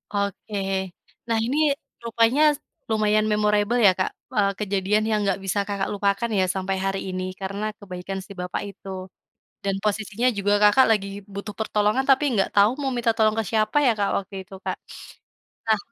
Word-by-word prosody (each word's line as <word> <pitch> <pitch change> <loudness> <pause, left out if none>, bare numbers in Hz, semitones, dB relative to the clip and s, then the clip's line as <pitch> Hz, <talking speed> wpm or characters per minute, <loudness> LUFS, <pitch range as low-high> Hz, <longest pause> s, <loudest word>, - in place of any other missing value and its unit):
Oke. 200 +1 -3 0.7
Nah 230 -1 +1
ini 270 +5 -1 0.5
rupanya 230 +4 +2
s - - -14 0.3
lumayan 215 0 +3
memorable 210 +2 +2
ya, 190 - +8
Kak, 185 - +1 0.2
eee, 200 -1 +3
kejadian 205 +1 +1
yang 215 -1 +1
nggak 195 -1 0
bisa 195 +2 0
Kakak 200 -1 -2
lupakan 200 +2 0
ya, 185 - +4
sampai 190 0 -1
hari 195 0 0
ini 185 0 -3 0.2
karena 200 +3 -3
kebaikan 190 0 -6
si 200 - -14
bapak 180 -1 -4
itu. 195 0 -11 0.7
Dan 195 -1 0
posisinya 215 +3 0
juga 205 +1 +2
Kakak 210 +6 +6
lagi 200 -2 +1 0.3
butuh 200 +1 -6
pertolongan, 215 +4 +1
tapi 270 +2 +5
nggak 195 -4 +2
tau 205 +3 +6
mau 270 - 0
minta 235 -1 +2
tolong 215 -1 +3
ke 225 - +1
siapa 215 +3 +1
ya, 245 - +6
Kak, 200 - +2
waktu 200 +1 -6
itu, 190 - -15
Kak. - - -2 0.9
Nah 220 - +4
205 Hz, 175 wpm, -24 LUFS, 195-220 Hz, 0.9 s, ya